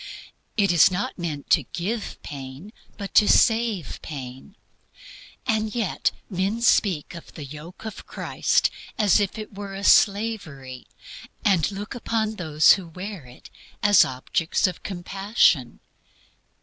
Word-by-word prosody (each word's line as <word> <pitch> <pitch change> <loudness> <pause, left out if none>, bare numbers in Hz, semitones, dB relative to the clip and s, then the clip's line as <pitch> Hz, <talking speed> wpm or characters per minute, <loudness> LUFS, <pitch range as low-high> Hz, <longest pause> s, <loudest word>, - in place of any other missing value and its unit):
It 200 -3 +3
is 170 -3 +6
not 185 +1 -3
meant 155 -5 -5
to 165 - +6
give 195 - -4
pain, 140 - -9 0.2
but 200 -2 -7
to 210 - +6
save 225 - +2
pain. 135 +5 -8 0.9
And 220 0 -1
yet 220 -7 0 0.2
men 195 +5 -2
speak 185 -10 +2
of 170 - -11
the 150 - -7
yoke 155 +9 -11
of 220 - -8
Christ - - 0 0.3
as 210 -1 +4
if 205 +1 -1
it 215 -1 -8
were 195 0 -7
slavery, 195 - +1 0.6
and 190 -4 +3
look 205 +1 -6
upon 220 -2 -2
those 155 -3 +4
who 190 -3 +2
wear 180 -3 -8
it 125 - -15 0.3
as 205 -2 +7
objects 130 +5 -1
of 185 -3 -2
compassion. 190 - +1
190 Hz, 130 wpm, -24 LUFS, 155-210 Hz, 0.9 s, as